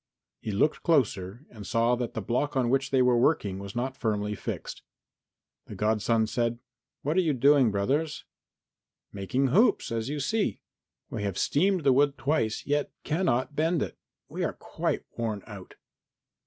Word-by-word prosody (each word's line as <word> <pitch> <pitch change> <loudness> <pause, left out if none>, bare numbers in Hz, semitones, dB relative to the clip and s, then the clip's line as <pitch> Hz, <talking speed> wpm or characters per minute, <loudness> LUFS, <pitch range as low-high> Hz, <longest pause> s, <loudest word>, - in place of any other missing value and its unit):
He - - -6
looked 130 +10 +1
closer 120 - 0
and 110 -3 -10
saw 115 +1 +2
that 120 -1 -4
the 110 - -3
block 135 +7 -1
on 125 -2 +2
which 135 0 +1
they 130 -2 +3
were 125 -1 +4
working 105 -8 +1
was 100 +1 -8
not 130 +2 -2
firmly 105 -2 -1
fixed. 100 - -6 0.9
And - - -8
the - - -9
godson 110 +1 +2
said, 120 +1 -1 0.5
"What 155 +5 0
are - - +6
you 160 -4 +1
doing, 140 -1 +5
brothers?" 135 +10 -1 0.9
"Making 125 +8 0
hoops, 195 - +3
as 115 +2 -2
you 150 0 -3
see. 210 +10 0 0.5
We - - -3
have 100 -2 -2
steamed 185 +3 +2
the 135 -2 +5
wood 140 +1 +3
twice, 135 -5 0
yet 145 0 0
cannot 150 -4 0
bend 160 +1 +1
it. - - -6 0.3
We - - -4
are - - -1
quite - - -3
worn 110 -4 -2
out." 100 -4 -11
125 Hz, 170 wpm, -28 LUFS, 110-145 Hz, 0.9 s, are